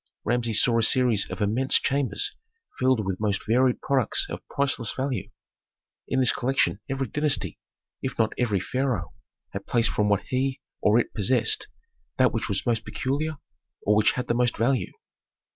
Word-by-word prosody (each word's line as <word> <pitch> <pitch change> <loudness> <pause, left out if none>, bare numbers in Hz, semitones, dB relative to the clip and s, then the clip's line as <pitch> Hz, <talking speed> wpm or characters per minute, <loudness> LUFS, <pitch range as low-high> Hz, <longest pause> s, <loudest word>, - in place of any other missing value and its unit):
Rameses 115 -1 +1
saw 115 -1 +3
a - - +2
series 115 -2 +3
of 105 - -3
immense 120 +6 +2
chambers 135 -6 0 0.4
filled 130 -5 +2
with 95 -1 -3
most 105 -2 -1
varied 125 +3 +2
products 135 -5 +1
of - - -5
priceless 135 -5 -1
value. 130 -7 -3 0.8
In 130 - 0
this 125 - +5
collection 130 -5 0
every 135 0 -1
dynasty, 150 +3 -1 0.4
if - - -4
not 110 -1 +1
every 110 -6 0
pharaoh, 120 -5 -2 0.4
had 100 0 -7
placed 120 -1 +2
from 105 -1 +1
what 100 -2 +1
he 130 +1 -1 0.2
or 105 +2 +4
it 120 - 0
possessed, 115 +2 +2 0.5
that - - +3
which - - -2
was 95 0 -1
most 115 -2 0
peculiar, 145 +3 -2 0.5
or 105 - +3
which 105 0 +3
had 125 - -3
the - - +1
most 120 0 +1
value. 125 +2 0
120 Hz, 165 wpm, -25 LUFS, 105-130 Hz, 0.8 s, this